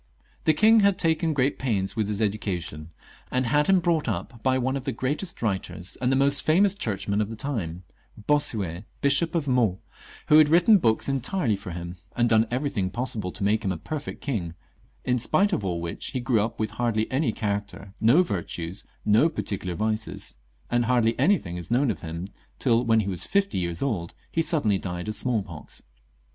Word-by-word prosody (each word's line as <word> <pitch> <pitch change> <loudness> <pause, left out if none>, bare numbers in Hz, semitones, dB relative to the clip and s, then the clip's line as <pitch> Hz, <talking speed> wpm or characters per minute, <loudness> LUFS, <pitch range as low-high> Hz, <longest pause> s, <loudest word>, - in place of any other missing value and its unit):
The 155 - +5
king 220 +4 +6
had 200 -2 +4
taken 165 0 +1
great 140 -1 0
pains 100 -7 -1
with 110 -3 0
his 105 +1 -1
education, 90 -7 -3 0.4
and 130 0 0
had 150 +5 +2
him 190 -1 +5
brought 165 -3 +1
up 115 -3 -4
by 130 +3 +2
one 130 +1 0
of 135 - -3
the - - 0
greatest 145 - -3
writers, 95 -3 -2
and 125 0 +2
the - - +3
most 140 +1 +4
famous 190 +5 +4
Churchman 105 - -2
of 105 - -2
the 115 - -6
time 105 - -4 0.2
— 105 - -18
Bossuet, 105 - 0 0.2
Bishop 140 +4 +2
of 160 -4 0
Meaux 120 -8 +2 0.3
— - - -19
who 150 - +7
had 155 -1 +6
written 180 +6 +6
books 110 -7 +2
entirely 135 - 0
for 100 0 -9
him, 85 +1 -6 0.2
and 120 0 +2
done 110 0 +4
everything 125 -7 -1
possible 110 -4 -3
to 100 - -6
make 110 +2 +2
him 95 - 0
a 90 - -3
perfect 150 - -6
king, 95 - -3 0.5
in 125 0 +1
spite 190 - +2
of 105 - 0
all 90 -3 -1
which 85 0 -5
he 130 - -1
grew 120 -3 +2
up 115 +2 -3
with 110 -1 -1
hardly 115 -2 0
any 130 -2 +1
character, 100 -2 -4
no 120 +11 +6
virtues, 90 - -4 0.2
no 110 +10 +5
particular 95 - -4
vices; 110 +3 -3 0.4
and 120 0 +2
hardly 120 -2 +3
any 185 +9 +5
thing 90 - -7
is 85 - -8
known 125 +2 +2
of - - -6
him 85 +1 -5 0.3
till, 115 - +2
when 115 -2 +3
he 100 - -4
was 95 -3 -3
fifty 200 - +1
years 85 -1 -3
old, 100 -11 -2 0.2
he 165 - +1
suddenly 115 - +1
died 90 0 -5
of 110 - -2
smallpox. 105 - -4
115 Hz, 200 wpm, -25 LUFS, 100-140 Hz, 0.5 s, who